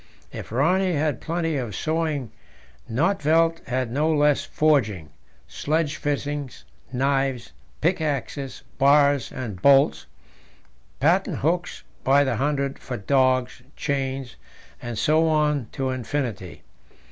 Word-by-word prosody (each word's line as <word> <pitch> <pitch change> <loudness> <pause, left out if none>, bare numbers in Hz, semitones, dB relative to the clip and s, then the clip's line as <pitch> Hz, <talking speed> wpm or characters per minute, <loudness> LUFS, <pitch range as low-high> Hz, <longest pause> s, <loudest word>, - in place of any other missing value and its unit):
If - - -8
Rönne 180 - +2
had 150 -3 -1
plenty 165 -2 -1
of 120 -6 -4
sewing, 155 -6 -2 0.6
Nödtvedt 165 - +2
had 130 -2 -1
no 150 +5 +1
less 150 -2 +3
forging 110 - +1 0.4
sledge 155 0 -1
fittings, 145 -2 -3 0.3
knives, 135 -1 0 0.3
pickaxes, 150 -5 -2 0.2
bars 140 0 +4
and 105 -8 -6
bolts, 140 +2 +4 0.9
patent 170 +3 +2
hooks 175 +4 -1 0.2
by 140 +2 +4
the 130 -5 -1
hundred 140 +1 -1
for 125 - -5
dogs, 130 +2 +1
chains, 135 -3 -3 0.4
and 120 -2 -5
so 155 +7 +3
on 150 -5 +1
to 135 -1 -2
infinity. 120 -7 -4
140 Hz, 110 wpm, -24 LUFS, 130-155 Hz, 0.9 s, bars